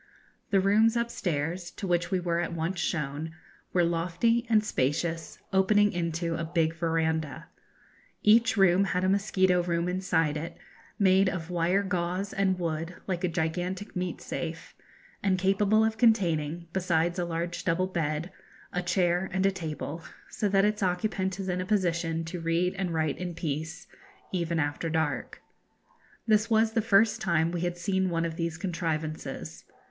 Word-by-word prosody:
The 195 Hz, -, +4 dB
rooms 215 Hz, +4 st, +4 dB
upstairs, 175 Hz, -7 st, -2 dB
to -, -, -6 dB
which 175 Hz, -2 st, +1 dB
we 185 Hz, -, +1 dB
were 170 Hz, -1 st, 0 dB
at 175 Hz, -, -2 dB
once 170 Hz, +2 st, -2 dB
shown, 155 Hz, 0 st, -2 dB, 0.4 s
were 175 Hz, -, +3 dB
lofty 180 Hz, +8 st, +1 dB
and 215 Hz, -2 st, +4 dB
spacious, 160 Hz, -1 st, -1 dB, 0.2 s
opening 205 Hz, +2 st, +4 dB
into 170 Hz, -1 st, -2 dB
a 165 Hz, 0 st, -2 dB
big 165 Hz, -1 st, +1 dB
verandah. 160 Hz, -2 st, -1 dB, 0.7 s
Each 225 Hz, +2 st, +5 dB
room 195 Hz, 0 st, +5 dB
had 180 Hz, -1 st, -1 dB
a 185 Hz, -, +2 dB
mosquito 190 Hz, -2 st, +2 dB
room 170 Hz, 0 st, -1 dB
inside 170 Hz, -4 st, +1 dB
it, 160 Hz, +3 st, -6 dB, 0.4 s
made 190 Hz, -1 st, +4 dB
of 180 Hz, -2 st, -5 dB
wire 175 Hz, +3 st, +2 dB
gauze 185 Hz, +1 st, -2 dB
and 195 Hz, -1 st, +1 dB
wood, 165 Hz, 0 st, -3 dB
like 185 Hz, -2 st, -3 dB
a -, -, +3 dB
gigantic 180 Hz, +4 st, -2 dB
meat 180 Hz, -2 st, -3 dB
safe, 165 Hz, -1 st, -5 dB, 0.5 s
and 190 Hz, -2 st, +2 dB
capable 195 Hz, +3 st, +3 dB
of 220 Hz, 0 st, -2 dB
containing, 170 Hz, -8 st, +2 dB
besides 175 Hz, -1 st, +1 dB
a -, -, +1 dB
large 170 Hz, 0 st, -3 dB
double 180 Hz, +1 st, +1 dB
bed, 165 Hz, -2 st, -2 dB, 0.4 s
a 180 Hz, -, 0 dB
chair 180 Hz, +1 st, +1 dB
and 190 Hz, 0 st, +1 dB
a 195 Hz, -, +4 dB
table, 160 Hz, -2 st, -5 dB, 0.3 s
so 210 Hz, -, -1 dB
that 195 Hz, 0 st, +4 dB
its 210 Hz, 0 st, 0 dB
occupant 190 Hz, 0 st, -1 dB
is 190 Hz, -, -4 dB
in 180 Hz, 0 st, -1 dB
a -, -, -3 dB
position 170 Hz, -5 st, 0 dB
to 170 Hz, +1 st, -5 dB
read 170 Hz, +3 st, +1 dB
and 190 Hz, -2 st, -2 dB
write 155 Hz, -3 st, 0 dB
in 180 Hz, -2 st, -4 dB
peace, 160 Hz, 0 st, -4 dB, 0.5 s
even 170 Hz, -2 st, -1 dB
after 145 Hz, +2 st, -1 dB
dark. 160 Hz, -5 st, -2 dB, 0.8 s
This 215 Hz, 0 st, +3 dB
was 220 Hz, 0 st, +3 dB
the 225 Hz, 0 st, +1 dB
first 210 Hz, 0 st, +3 dB
time 170 Hz, -2 st, +2 dB
we 175 Hz, -1 st, -3 dB
had 175 Hz, 0 st, -2 dB
seen 190 Hz, +1 st, 0 dB
one 165 Hz, -1 st, 0 dB
of 165 Hz, -1 st, -3 dB
these 165 Hz, -1 st, -2 dB
contrivances. 160 Hz, -3 st, -4 dB
175 Hz, 160 wpm, -28 LUFS, 165-190 Hz, 0.8 s, Each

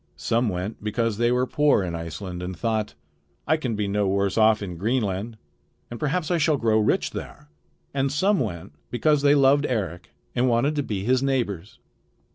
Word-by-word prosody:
Some 115 Hz, 0 st, +1 dB
went 95 Hz, +4 st, -5 dB
because 110 Hz, 0 st, -1 dB
they 120 Hz, 0 st, +3 dB
were 125 Hz, +1 st, +2 dB
poor 145 Hz, -6 st, +2 dB
in 90 Hz, -2 st, -4 dB
Iceland 85 Hz, +2 st, -6 dB
and 90 Hz, 0 st, -5 dB
thought: 110 Hz, -1 st, -1 dB, 0.5 s
"I 155 Hz, -, +3 dB
can 130 Hz, -8 st, -3 dB
be 105 Hz, -1 st, -1 dB
no 100 Hz, 0 st, 0 dB
worse 100 Hz, 0 st, 0 dB
off 110 Hz, -1 st, +4 dB
in 90 Hz, -3 st, -5 dB
Greenland, 110 Hz, 0 st, -1 dB, 0.5 s
and 120 Hz, -, -6 dB
perhaps 155 Hz, +3 st, -1 dB
I 175 Hz, -, +2 dB
shall 155 Hz, -1 st, +2 dB
grow 110 Hz, -3 st, +2 dB
rich 105 Hz, -, +1 dB
there." 75 Hz, -, -8 dB, 0.4 s
And 135 Hz, 0 st, 0 dB
some 190 Hz, +7 st, +2 dB
went 85 Hz, -, -4 dB, 0.2 s
because 150 Hz, +4 st, +2 dB
they 145 Hz, 0 st, +5 dB
loved 140 Hz, +1 st, +4 dB
Eric 90 Hz, -8 st, -3 dB, 0.2 s
and 125 Hz, +1 st, +2 dB
wanted 120 Hz, +6 st, +2 dB
to -, -, +2 dB
be 105 Hz, -8 st, -3 dB
his 130 Hz, +3 st, +2 dB
neighbors. 115 Hz, -9 st, -2 dB
115 Hz, 185 wpm, -24 LUFS, 100-135 Hz, 0.5 s, they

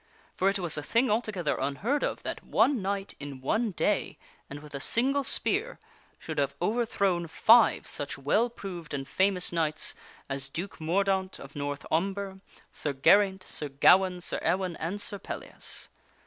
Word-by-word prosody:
For 190 Hz, -, +2 dB
it 200 Hz, -, 0 dB
was 175 Hz, -5 st, +1 dB
a -, -, -4 dB
thing 230 Hz, -, +1 dB
altogether 210 Hz, -7 st, -1 dB
unheard 195 Hz, -, -1 dB
of -, -, -2 dB
that -, -, -5 dB
one 270 Hz, -6 st, +2 dB
knight, 195 Hz, +1 st, -3 dB
in 145 Hz, -2 st, -7 dB
one 220 Hz, -, 0 dB
day, 180 Hz, -, -1 dB, 0.3 s
and 140 Hz, -, -7 dB
with 150 Hz, -1 st, -12 dB
a 140 Hz, -, -4 dB
single 270 Hz, -, +2 dB
spear, 445 Hz, -, +1 dB, 0.4 s
should -, -, -5 dB
have -, -, 0 dB
overthrown 200 Hz, -6 st, 0 dB
five 230 Hz, +7 st, +5 dB
such 145 Hz, -1 st, -2 dB
well 180 Hz, -, +2 dB
proved 180 Hz, -9 st, -7 dB
and 135 Hz, -1 st, -5 dB
famous 185 Hz, +4 st, +1 dB
knights 155 Hz, -2 st, 0 dB, 0.3 s
as 135 Hz, 0 st, -2 dB
Duke 175 Hz, +4 st, -6 dB
Mordaunt 190 Hz, +3 st, 0 dB
of 140 Hz, 0 st, -12 dB
North 145 Hz, 0 st, -4 dB
Umber, 195 Hz, +3 st, -1 dB, 0.3 s
Sir 145 Hz, -, -2 dB
Geraint, 190 Hz, +7 st, +4 dB
Sir 150 Hz, -, -3 dB
Gawaine, 180 Hz, +6 st, +4 dB
Sir -, -, -1 dB
Ewaine, 185 Hz, -2 st, 0 dB
and 180 Hz, +6 st, -3 dB
Sir 205 Hz, 0 st, -2 dB
Pellias. -, -, -6 dB
185 Hz, 160 wpm, -28 LUFS, 150-205 Hz, 0.4 s, five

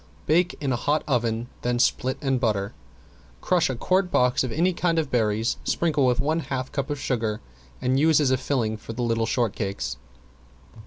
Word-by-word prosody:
Bake 175 Hz, +3 st, +2 dB
in 140 Hz, -3 st, -1 dB
a 120 Hz, -, -3 dB
hot 150 Hz, +1 st, +1 dB
oven, 120 Hz, -3 st, 0 dB
then 120 Hz, 0 st, 0 dB
split 130 Hz, +1 st, +1 dB
and 135 Hz, -2 st, +1 dB
butter. 105 Hz, -5 st, 0 dB, 0.7 s
Crush 180 Hz, -5 st, +2 dB
a 130 Hz, -, -2 dB
quart 185 Hz, +8 st, +1 dB
box 125 Hz, -6 st, +2 dB
of 130 Hz, -, -3 dB
any 175 Hz, +8 st, +2 dB
kind 170 Hz, -1 st, 0 dB
of 155 Hz, -4 st, 0 dB
berries, 110 Hz, -1 st, +1 dB
sprinkle 150 Hz, -5 st, +1 dB
with 125 Hz, -1 st, +2 dB
one 155 Hz, +3 st, +1 dB
half 130 Hz, -4 st, -4 dB
of -, -, -25 dB
cup 140 Hz, -2 st, -3 dB
of 145 Hz, -1 st, -3 dB
sugar 110 Hz, -6 st, -1 dB, 0.4 s
and 130 Hz, +2 st, +2 dB
use 160 Hz, +1 st, +4 dB
as 140 Hz, -3 st, +2 dB
a 130 Hz, -, +3 dB
filling 120 Hz, -5 st, -1 dB
for 115 Hz, -, -8 dB
the 120 Hz, +2 st, -3 dB
little 115 Hz, -1 st, 0 dB
shortcakes. 100 Hz, -, -2 dB
130 Hz, 195 wpm, -25 LUFS, 115-150 Hz, 0.7 s, use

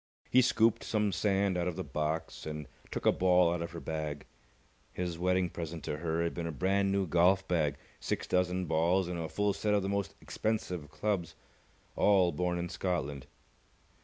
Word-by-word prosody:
He 130 Hz, -, +7 dB
scooped 115 Hz, -2 st, +3 dB
some 105 Hz, -2 st, +1 dB
sand 95 Hz, -1 st, +1 dB
out 85 Hz, -, 0 dB
of 90 Hz, -, -2 dB
the 95 Hz, -, -3 dB
box, 75 Hz, 0 st, -3 dB
and 75 Hz, -1 st, -5 dB, 0.2 s
took -, -, -5 dB
a -, -, +7 dB
ball 90 Hz, -2 st, +4 dB
out 85 Hz, -, -2 dB
of 85 Hz, -, -3 dB
her 85 Hz, -, -7 dB
bag. 75 Hz, -3 st, -4 dB, 0.7 s
His 90 Hz, -2 st, -3 dB
wedding 90 Hz, 0 st, +2 dB
present 85 Hz, -1 st, -6 dB
to 75 Hz, -, -3 dB
her 80 Hz, +1 st, -1 dB
had 85 Hz, -, -1 dB
been 85 Hz, -1 st, -3 dB
a -, -, -2 dB
brand 95 Hz, +5 st, +1 dB
new 100 Hz, -1 st, +1 dB
golf 90 Hz, +3 st, +3 dB
bag, 75 Hz, -6 st, +1 dB, 0.2 s
six -, -, -2 dB
dozen 90 Hz, 0 st, +1 dB
balls, 85 Hz, +3 st, +2 dB
and 90 Hz, -1 st, -3 dB
a 80 Hz, -1 st, -3 dB
full 100 Hz, +5 st, +1 dB
set 105 Hz, +1 st, +1 dB
of 100 Hz, -, +1 dB
the 95 Hz, -, -1 dB
most 100 Hz, -1 st, -2 dB
expensive 90 Hz, -8 st, -3 dB
clubs, 90 Hz, +2 st, -2 dB, 0.6 s
all 95 Hz, -4 st, +4 dB
born 90 Hz, +3 st, -1 dB
in 85 Hz, 0 st, -2 dB
Scotland. 80 Hz, -7 st, -2 dB
90 Hz, 190 wpm, -31 LUFS, 80-95 Hz, 0.7 s, He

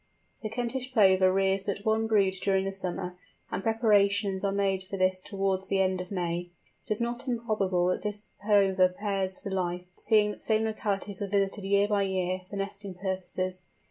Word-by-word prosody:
The 215 Hz, -, -3 dB
Kentish 245 Hz, +3 st, -3 dB
Plover 190 Hz, -4 st, +5 dB
rears 195 Hz, 0 st, +2 dB
but 200 Hz, 0 st, -4 dB
one 220 Hz, 0 st, +2 dB
brood 200 Hz, -4 st, +3 dB
during 195 Hz, -1 st, +2 dB
the 195 Hz, -, -2 dB
summer, 180 Hz, -1 st, -3 dB, 0.4 s
and -, -, -2 dB
preparations 205 Hz, -3 st, +2 dB
are 200 Hz, -, +1 dB
made 195 Hz, -1 st, +1 dB
for 190 Hz, +1 st, -6 dB
this 185 Hz, 0 st, +2 dB
towards 195 Hz, -1 st, -2 dB
the 195 Hz, -, +1 dB
end 185 Hz, -1 st, +1 dB
of 180 Hz, -, -8 dB
May. 175 Hz, -2 st, -2 dB, 0.4 s
It -, -, -13 dB
is 210 Hz, -, -4 dB
not 240 Hz, +3 st, -2 dB
improbable 215 Hz, -7 st, 0 dB
that 180 Hz, -, -1 dB
this 210 Hz, 0 st, -3 dB
Plover 195 Hz, -3 st, +4 dB
pairs 190 Hz, -1 st, -2 dB
for 200 Hz, -, -7 dB
life, 180 Hz, -1 st, -2 dB
seeing 210 Hz, -2 st, +3 dB
that -, -, -9 dB
the -, -, -4 dB
same 220 Hz, 0 st, +3 dB
localities 205 Hz, -3 st, -1 dB
are 200 Hz, -, -1 dB
visited 200 Hz, 0 st, 0 dB
year 200 Hz, +1 st, +3 dB
by 205 Hz, -1 st, +1 dB
year 185 Hz, -1 st, -1 dB
for 205 Hz, -, -7 dB
nesting 195 Hz, -1 st, -5 dB
purposes. 185 Hz, -1 st, -3 dB
195 Hz, 190 wpm, -28 LUFS, 185-210 Hz, 0.4 s, Plover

